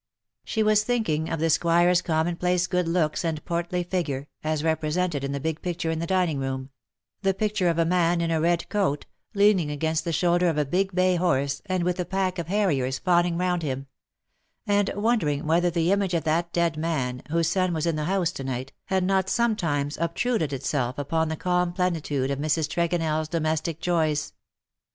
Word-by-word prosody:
She 220 - 0
was 215 0 +4
thinking 215 -11 0
of 165 - -2
the 160 - +1
Squire^s 170 +2 +3
commonplace 175 +2 +1
good 180 -1 0
looks 165 -2 0
and 160 -3 -3
portly 175 +1 -1
figure, 160 -6 -2 0.2
as 155 -1 -1
represented 160 -1 0
in 140 - -2
the 140 - -2
big 160 +2 -3
picture 170 -2 -2
in 160 - -2
the 170 - -3
dining 180 -6 +1
room 135 0 -4 0.2
— - - -59
the 195 -1 +1
picture 210 -3 0
of 165 - 0
a 165 - +3
man 175 0 +2
in 165 -1 0
a 160 -1 +1
red 170 0 +1
coat^ 190 -9 0 0.3
leaning 200 -6 +4
against 160 +2 -1
the 170 - -2
shoulder 175 +2 +2
of 160 -3 0
a 150 - +2
big 190 +5 0
bay 185 -1 +3
horse, 140 -5 0
and 185 -2 0
with 180 +1 -1
a 180 - 0
pack 190 -1 -1
of 165 - -4
harriers 150 -10 +1
fawning 175 -2 +2
round 180 -1 0
him 135 -3 -3 0.4
— - - -48 0.3
and 205 -1 +2
wondering 205 -10 +1
whether 170 +3 +3
the 170 +1 +1
image 195 -3 +1
of 165 - 0
that 170 +2 0
dead 170 -2 +1
man, 135 -6 -2
whose 165 0 +1
son 185 -2 +1
was 160 -2 -1
in 165 -2 +1
the 150 -1 -2
house 185 -1 +1
to 135 - -7
night, 130 0 -4
had 190 -2 0
not 190 0 +1
sometimes 165 -13 0
obtruded 170 - 0
itself 130 -2 -2
upon 160 +3 0
the 160 - -2
calm 180 +1 0
plenitude 160 -7 -1
of 140 - -2
Mrs. 155 +1 0
TregonelPs 165 -2 0
domestic 160 0 -1
joys. 160 -4 0
170 Hz, 195 wpm, -25 LUFS, 155-180 Hz, 0.4 s, was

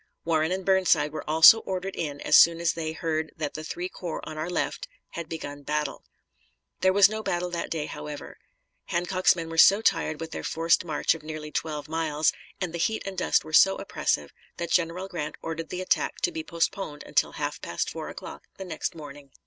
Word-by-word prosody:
Warren 160 0 +1
and 190 0 -2
Burnside 190 -6 +3
were 155 0 -6
also 160 +8 +9
ordered 190 -1 -4
in 145 -3 -4
as - - +3
soon 170 0 +7
as 170 -1 +1
they 160 -1 -3
heard 160 -1 -2
that 150 -2 -3
the 155 - -6
three 175 +3 -4
corps 175 -3 -6
on 155 - -6
our 155 +3 -3
left 180 - -2 0.2
had 170 -2 -6
begun 145 -3 -6
battle. 150 +1 -2 0.8
There 190 - +4
was 200 0 +7
no 215 +1 -4
battle 175 -3 -2
that 170 - -3
day, 155 -2 -2
however. 150 -1 -8 0.5
Hancock's 180 +2 +2
men 165 -2 -5
were 165 0 -2
so 200 +5 +8
tired 155 -8 +1
with 165 -1 -6
their - - -5
forced 165 +1 +2
march 155 -3 +1
of 165 - -9
nearly 155 0 -7
twelve 150 -2 -3
miles, 155 -1 +1 0.3
and 180 -3 -3
the 170 - -4
heat 220 +6 0
and 195 -1 -5
dust 180 - +1
were 155 - -10
so 195 +4 +7
oppressive, 75 - -2 0.3
that 170 -1 -4
General 180 +2 +1
Grant 155 -5 -5
ordered 165 0 -4
the 180 - -4
attack 185 - 0
to 355 - +1
be 325 -1 -5
postponed 170 - -2
until - - +1
half - - -4
past - - -2
four - - -6
o'clock - - -9
the 190 - -6
next 165 -2 -4
morning. 145 -2 -10
165 Hz, 205 wpm, -26 LUFS, 155-180 Hz, 0.8 s, also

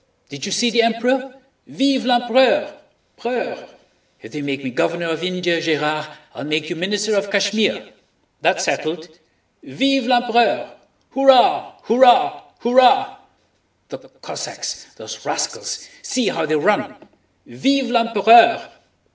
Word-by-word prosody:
Did 140 +2 -7
you - - -5
see 240 +4 +1
the 235 +1 +3
Emperor? 250 +4 0 0.4
Vive 270 -2 0
l'Empereur!... 260 +5 +2 0.4
preur!—If 240 0 -8
they 150 - -6
make 140 -1 -4
me 130 - -5
Governor 170 +6 -2
of 160 +1 -4
India, 180 -2 -1
Gérard, 155 -1 -1 0.3
I'll - - -8
make 155 +2 -3
you - - -3
Minister 205 +5 -2
of 200 0 -1
Kashmir—that's 205 +1 -2
settled. 160 +2 -3 0.5
Vive 270 -1 -1
l'Empereur! 240 -2 +1 0.4
Hurrah! 270 -2 +4
hurrah! 245 +1 +3 0.2
hurrah! 260 +12 +3 0.7
The - - -9
Cossacks—those - - -9
rascals—see 255 -5 -4
how 160 -1 -3
they 155 - 0
run! 200 +8 0 0.5
Vive 270 -2 -1
l'Empereur! 230 -1 +4
230 Hz, 110 wpm, -19 LUFS, 170-250 Hz, 0.7 s, Hurrah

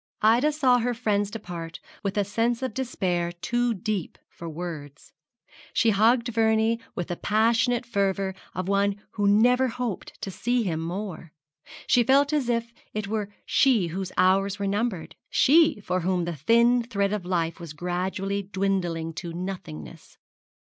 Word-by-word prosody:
Ida 240 +8 +5
saw 260 -5 +3
her 245 +1 -1
friends 205 -4 0
depart 175 -6 -7 0.2
with 200 0 -3
a 205 - +3
sense 230 +5 0
of 260 - -2
despair 180 -9 -1
too 240 +7 -1
deep 205 -3 -3
for 170 - -8
words. 155 -3 -8 0.6
She 225 - +3
hugged 230 +4 +3
Vernie 225 0 +2 0.2
with 175 - -4
the 175 - -2
passionate 230 +5 +2
fervour 195 -3 0 0.2
of 185 0 -3
one 200 0 +1
who 205 -1 0
never 245 +5 +4
hoped 245 -4 -5
to 195 - -4
see 240 +5 0
him 165 -6 -1
more. 170 -1 -5 0.5
She 245 - +4
felt 280 +4 +3
as 280 -5 +1
if 230 0 -1 0.2
it 215 -2 -2
were 210 -1 -3
she 230 -11 +3
whose 185 +2 -4
hours 195 +2 +3
were 200 - -3
numbered, 200 -3 -2 0.2
she 310 -4 +4
for 185 -2 -1
whom 180 0 0
the 170 -1 -3
thin 235 - +4
thread 200 -4 -1
of 210 -3 -2
life 170 -2 -1
was 170 -3 -8
gradually 185 +4 -2
dwindling 185 -4 -2
to 170 0 -6
nothingness. 165 - -7
200 Hz, 155 wpm, -26 LUFS, 180-235 Hz, 0.6 s, Ida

